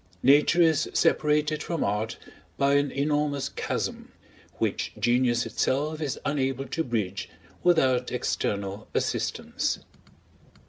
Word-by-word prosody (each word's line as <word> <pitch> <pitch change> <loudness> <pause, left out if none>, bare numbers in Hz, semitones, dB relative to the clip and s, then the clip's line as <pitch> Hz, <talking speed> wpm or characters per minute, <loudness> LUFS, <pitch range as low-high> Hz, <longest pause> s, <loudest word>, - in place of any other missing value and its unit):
Nature 150 +6 +5
is 160 -2 +2
separated 150 0 +2
from 165 -1 -2
Art 105 +3 -1 0.4
by 140 0 +3
an 140 0 +3
enormous 145 -1 0
chasm, - - -4 0.5
which - - -1
genius 120 +2 +2
itself 150 +4 -1
is 145 -4 -2
unable 135 -2 -1
to 160 +5 -2
bridge 100 - -2 0.3
without 130 -8 +3
external 100 -4 -2
assistance. - - -1
140 Hz, 105 wpm, -27 LUFS, 120-150 Hz, 0.5 s, Nature